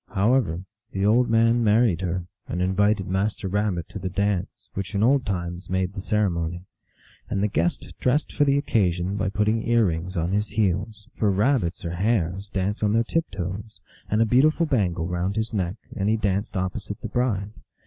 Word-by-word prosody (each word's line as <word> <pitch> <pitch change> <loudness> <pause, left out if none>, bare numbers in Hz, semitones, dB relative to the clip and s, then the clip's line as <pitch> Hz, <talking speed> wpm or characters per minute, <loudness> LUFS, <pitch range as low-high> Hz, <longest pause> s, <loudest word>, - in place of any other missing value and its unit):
However, 95 -5 +2 0.3
the 95 +1 0
old 120 +4 +4
man 115 +1 +4
married 105 -4 +3
her, 90 -1 -2 0.2
and 90 - -3
invited 100 +2 +2
Master 95 +2 -1
Rabbit 95 -3 -1
to - - -7
the 95 -1 -3
dance, 100 0 -2
which 95 +2 -5
in 100 - +2
old 130 +1 +3
times 90 -1 -3
made 95 0 0
the 95 - -5
ceremony. 90 -5 -1 0.7
And 100 - 0
the - - +3
guest 85 -3 -1
dressed 135 +4 +1
for 145 - +3
the 140 -1 +3
occasion 95 - +1
by 95 -1 0
putting 105 +3 +1
ear 120 -1 +3
rings 90 +1 -2
on 85 +2 0
his 105 +2 +1
heels 105 0 -1
for 105 - +1
Rabbits 100 -4 +1
or 85 - -2
Hares 95 0 0
dance 100 +1 -2
on 105 -1 +2
their 115 +1 +3
tip 165 +7 -1
toes 100 +3 -6 0.3
and 110 +2 +3
a - - +2
beautiful 150 +8 +4
bangle 95 - 0
round 90 +3 -1
his 110 0 -2
neck, 95 -3 -1 0.2
and 100 +1 0
he 110 - +3
danced 100 0 -1
opposite 100 +2 -3
the 115 - -4
bride. 105 -4 -1
100 Hz, 190 wpm, -25 LUFS, 90-110 Hz, 0.7 s, old